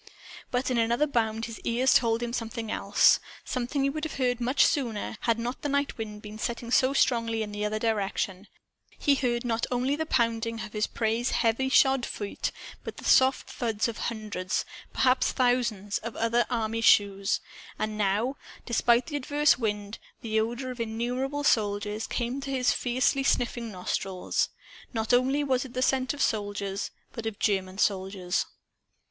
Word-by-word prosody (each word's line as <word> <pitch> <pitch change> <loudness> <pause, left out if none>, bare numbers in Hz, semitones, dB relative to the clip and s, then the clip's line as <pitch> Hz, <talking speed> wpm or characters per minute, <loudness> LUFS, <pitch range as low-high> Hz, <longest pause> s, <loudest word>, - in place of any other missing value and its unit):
But 255 +1 0
in 245 - +2
another 235 +5 +2
bound 225 -5 0
his 230 -1 -8
ears 250 +3 +2
told 230 -1 +3
him 235 0 -3
something 230 -2 -4
else 200 +1 +4 0.3
something 255 +3 -1
he 275 - +3
would 305 +1 -5
have 315 - -3
heard 245 -2 0
much 255 +4 +4
sooner, 230 -7 -1
had 230 -1 +2
not 240 +2 -4
the 290 - -2
night 280 0 0
wind 210 -1 -6
been 215 0 -9
setting 235 0 -3
so 260 +1 +4
strongly 230 -4 +2
in 210 - -6
the 205 0 -4
other 210 +1 -1
direction. 200 -3 -1 0.5
He 285 - +3
heard 245 -3 0
not 230 -1 0
only 255 +3 +1
the 315 +1 -3
pounding 230 -3 0
of 205 - -7
his 210 0 0
prey's 230 +2 0
heavy 235 +3 +1
shod 265 -1 +4
feet, 205 -3 -3 0.3
but - - -7
the - - -10
soft 260 0 +4
thud 225 -3 -1
of 230 - -5
hundreds 210 -4 -3 0.3
perhaps 255 0 +3
thousands 235 -6 +1
of 230 0 -6
other 235 +1 +1
army 230 -1 -1
shoes. 200 -3 +4 0.4
And 215 0 -2
now, 210 +6 0 0.3
despite 235 0 +3
the 295 -3 -3
adverse 290 -2 +2
wind, 210 -2 -3 0.2
the 220 -1 0
odor 240 +4 -2
of 250 - -9
innumerable 245 +5 -2
soldiers 210 -3 +1
came 245 +3 -2
to 275 - -6
his 260 -2 +2
fiercely 255 +3 +1
sniffing 240 -3 0
nostrils. 185 0 -1 0.4
Not 225 +1 0
only 265 +4 +3
was 260 -3 +1
it 260 -2 -11
the 255 - +1
scent 260 -1 +2
of 285 - 0
soldiers, 205 -2 -2 0.2
but 230 -3 -5
of 215 -2 -4
German 190 -2 0
soldiers. 190 -3 0
230 Hz, 170 wpm, -28 LUFS, 215-255 Hz, 0.5 s, else